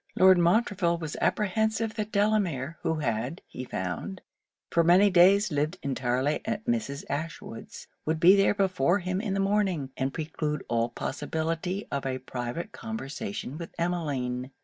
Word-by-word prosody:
Lord 185 -1 +7
Montreville 175 -1 +2
was 160 -3 -5
apprehensive 220 +2 +1
that 215 -1 -4
Delamere, 190 -9 +1
who 165 -1 0
had, 125 +1 -2
he 130 - -7
found, 110 - -4 0.5
for 170 - +4
many 185 +4 +6
days 185 +2 +5
lived 150 +5 0
entirely 130 +1 0
at 215 -1 -3
Mrs. 220 -13 -1
Ashwood's, 145 -5 -6 0.2
would 160 +1 -1
be 180 +4 +8
there 195 +1 +3
before 185 -3 +2
him 185 0 -2
in 205 -3 -2
the - - 0
morning, 195 -8 +1
and 135 +1 -1
preclude 150 -1 -3
all 115 0 +1
possibility 160 - -3
of 140 -1 -2
a 130 -1 -1
private 130 - -5
conversation 145 - -5
with 170 - -8
Emmeline. 140 -8 -2
170 Hz, 150 wpm, -28 LUFS, 135-195 Hz, 0.5 s, be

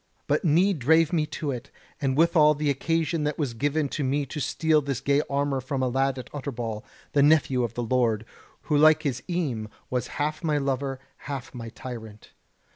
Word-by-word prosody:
But - - +1
need 175 +2 +3
drave 160 +5 +4
me 155 -3 +1
to 150 -2 -3
it, 125 +1 -6 0.3
and 135 -1 0
withal 155 -2 +5
the 145 0 +1
occasion 165 +2 0
that 150 -1 -1
was 140 -6 -1
given 145 +5 0
to 145 - -3
me 140 +2 0
to 150 - -6
steal 155 +3 +2
this 135 -3 -3
gay 140 +2 +2
armour 140 -1 0
from 130 0 -2
a - - +2
lad 135 +1 +1
at 125 - -7
Utterbol, 120 -6 -4 0.3
the 145 - +3
nephew 145 -3 +4
of 115 -1 -3
the 120 - -2
lord; 115 -2 +1 0.4
who 150 - -1
like 155 +1 +6
his 130 -5 -1
eme 135 -12 -2 0.2
was 125 -2 -1
half 150 +3 -1
my 155 -2 +1
lover, 135 -1 -1 0.3
half 135 -3 -5
my 115 -2 -7
tyrant. 110 -3 -9
140 Hz, 195 wpm, -26 LUFS, 125-150 Hz, 0.4 s, like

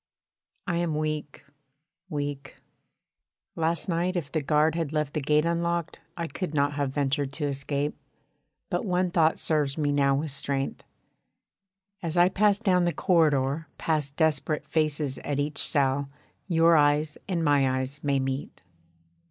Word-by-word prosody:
I 175 -4 -1
am 170 -3 0
weak 150 -2 -3 0.6
weak 145 -3 -4 1.0
last 165 +2 -1
night 175 +1 0
if 155 -5 -3
the 155 - 0
guard 150 +2 +2
had 165 -3 -2
left 150 -2 -1
the 155 - -1
gate 150 +2 +2
unlocked 170 0 -1 0.2
I 170 - -2
could 165 -1 -5
not 145 0 +2
have 145 -1 -1
ventured 140 0 -1
to 150 0 -2
escape, 140 +1 -2 0.8
but - - 0
one 180 -3 0
thought 160 -2 +3
serves 150 -3 0
me 145 -2 +1
now 140 -1 +3
with 150 +2 -2
strength. 140 0 -2 1.2
As 165 0 -3
I 175 +1 +6
pass 205 +1 +3
down 185 -5 +2
the 175 - +2
corridor 150 -3 +2
past 150 -3 -1
desperate 155 -1 0
faces 150 -3 0
at 145 -1 -3
each 145 +1 -1
cell, 140 -1 +2 0.4
your 165 -2 +4
eyes 150 0 +2
and 170 -4 -1
my 140 -2 +4
eyes 130 +2 -5
may 140 -2 +1
meet. 130 -6 -4
150 Hz, 150 wpm, -27 LUFS, 140-165 Hz, 1.2 s, I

